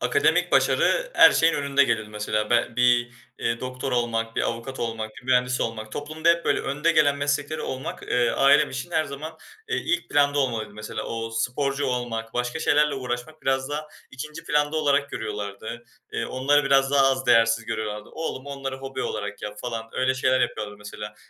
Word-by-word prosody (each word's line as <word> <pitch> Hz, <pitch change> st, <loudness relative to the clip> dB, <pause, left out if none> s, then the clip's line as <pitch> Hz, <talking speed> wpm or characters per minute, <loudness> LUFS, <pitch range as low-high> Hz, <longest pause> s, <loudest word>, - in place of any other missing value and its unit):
akademik -, -, +2 dB
başarı -, -, +3 dB
her 330 Hz, -1 st, +8 dB
şeyin 165 Hz, 0 st, +3 dB
önünde 140 Hz, 0 st, +3 dB
gelir, 110 Hz, -4 st, 0 dB
mesela. 105 Hz, 0 st, -2 dB
Be 120 Hz, -, +3 dB
bir, 120 Hz, -1 st, +3 dB, 0.3 s
eee, 115 Hz, 0 st, -1 dB
doktor 130 Hz, +1 st, -4 dB
olmak, 115 Hz, -2 st, -1 dB
bir -, -, +1 dB
avukat 115 Hz, +3 st, -4 dB
olmak, 115 Hz, -2 st, -3 dB
bir -, -, -11 dB
mühendis 125 Hz, 0 st, +2 dB
olmak, 110 Hz, -1 st, -3 dB
toplumda 155 Hz, +3 st, -2 dB
hep 170 Hz, 0 st, +4 dB
böyle 145 Hz, -, +2 dB
önde 150 Hz, +5 st, 0 dB
gelen 145 Hz, -3 st, +4 dB
meslekleri 145 Hz, +2 st, -1 dB
olmak, 130 Hz, 0 st, -5 dB
eee, 120 Hz, -1 st, +1 dB
ailem 145 Hz, +2 st, +4 dB
için 135 Hz, +6 st, -5 dB
her 160 Hz, -2 st, +1 dB
zaman, 155 Hz, +3 st, -7 dB, 0.3 s
eee, 450 Hz, -, 0 dB
ilk 345 Hz, +1 st, -1 dB
planda 145 Hz, 0 st, +3 dB
olmalıydı, 115 Hz, -6 st, -1 dB
mesela. 105 Hz, +1 st, -6 dB
Ooo, 115 Hz, 0 st, -4 dB
sporcu 135 Hz, +5 st, -1 dB
olmak, 120 Hz, -3 st, -3 dB
başka 125 Hz, +5 st, -1 dB
şeylerle 150 Hz, -2 st, +3 dB
uğraşmak 125 Hz, +4 st, -5 dB
biraz 135 Hz, 0 st, 0 dB
daha 150 Hz, +1 st, -4 dB, 0.2 s
2. 150 Hz, +5 st, -8 dB
planda 150 Hz, +1 st, +1 dB
olarak 140 Hz, -2 st, +2 dB
görüyorlardı. 105 Hz, +3 st, -5 dB, 0.3 s
Eee, -, -, -2 dB
onları 140 Hz, +3 st, +2 dB
biraz 135 Hz, 0 st, +3 dB
daha 140 Hz, -1 st, +5 dB
az 130 Hz, 0 st, -2 dB
değersiz 115 Hz, -1 st, +4 dB
görüyorlardı. 105 Hz, -2 st, -4 dB
"Oğlum, 150 Hz, -4 st, -5 dB
onları 135 Hz, -1 st, -5 dB
hobi 135 Hz, 0 st, -5 dB
olarak 105 Hz, -1 st, -4 dB
yap." 105 Hz, 0 st, -6 dB
falan. 115 Hz, -2 st, -4 dB
Öyle 130 Hz, +1 st, +1 dB
şeyler 130 Hz, 0 st, +2 dB
yapıyorlardı, 105 Hz, -4 st, -2 dB
mesela. 105 Hz, 0 st, -8 dB
130 Hz, 180 wpm, -25 LUFS, 115-145 Hz, 0.3 s, her